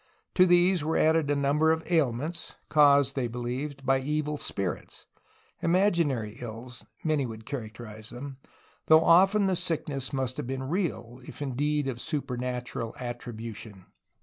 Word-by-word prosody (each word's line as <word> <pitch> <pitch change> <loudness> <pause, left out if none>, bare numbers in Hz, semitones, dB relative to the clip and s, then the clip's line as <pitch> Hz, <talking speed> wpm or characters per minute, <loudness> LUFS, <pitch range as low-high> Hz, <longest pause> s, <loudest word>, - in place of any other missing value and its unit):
To 185 0 +5
these 175 -1 +4
were 160 +2 0
added 160 -2 +3
a 145 - +2
number 145 +3 +3
of 160 0 0
ailments, 155 -1 -1
caused, 140 -2 +5
they 130 -3 0
believed, 125 +4 -5
by 135 0 +3
evil 150 +2 -1
spirits, 95 -3 -4 0.3
— - - -35
imaginary 165 - +1
ills, 120 0 -8 0.2
many 150 -4 +1
would 110 -1 -9
characterize 110 -4 -6
them, 135 +2 -8 0.5
though 160 0 +7
often 195 +4 +5
the 190 -1 +2
sickness 145 -6 -2
must 130 -2 -2
have - - -4
been 135 0 -3
real, 130 - -3
if - - -10
indeed 145 +1 -1
of 125 -2 -4
supernatural 125 -5 -3
attribution. 115 -5 -7
135 Hz, 145 wpm, -28 LUFS, 120-155 Hz, 0.5 s, though